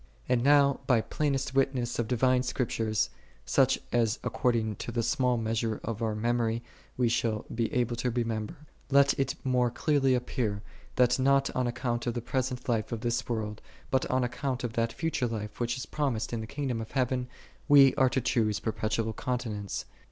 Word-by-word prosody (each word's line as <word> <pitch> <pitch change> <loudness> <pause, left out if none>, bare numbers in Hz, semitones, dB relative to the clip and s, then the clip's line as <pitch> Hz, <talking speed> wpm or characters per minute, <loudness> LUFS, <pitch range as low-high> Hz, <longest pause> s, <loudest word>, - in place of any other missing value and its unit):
22. 125 - +1
And 120 -1 +2
now 140 0 +5
by 120 -4 +4
plainest 135 0 -1
witnesses 130 -3 0
of 115 - 0
divine 125 +1 +3
Scriptures, 115 -4 -1 0.3
such - - +3 0.2
as 115 -1 +2
according 115 -4 0
to - - -5
the 115 0 -1
small 125 +1 +1
measure 115 -1 -1
of 115 -1 -4
our 110 -2 0
memory 115 +1 0 0.3
we 125 -1 +3
shall 115 -2 0
be 115 -1 -1
able 120 -1 0
to 125 +2 0
remember, 115 +3 -2 0.3
let 140 0 +5
it 135 - 0
more 125 -2 +2
clearly 135 +1 +2
appear, 115 -5 -2 0.3
that, 125 0 +3
not 135 +1 +3
on 125 -1 +1
account 120 0 -2
of 120 - -1
the - - 0
present 125 +1 -2
life 110 -3 0
of 115 -2 -3
this 120 +2 -1
world, 110 -2 -3 0.3
but 130 -1 +2
on 130 0 +2
account 130 +1 -2
of 120 -2 -3
that 115 0 0
future 160 -5 -1
life 105 -2 -5
which 120 +1 -1
is 130 - -5
promised 130 -7 -2
in 115 - -2
the 110 - -6
kingdom 130 -3 -3
of 110 - -8
heaven, 125 -1 0 0.4
we 140 -2 +7
are 130 -1 +3
to 130 - 0
choose 110 -3 +1
perpetual 110 0 -1
continence. 110 -5 -3
120 Hz, 185 wpm, -29 LUFS, 115-130 Hz, 0.4 s, we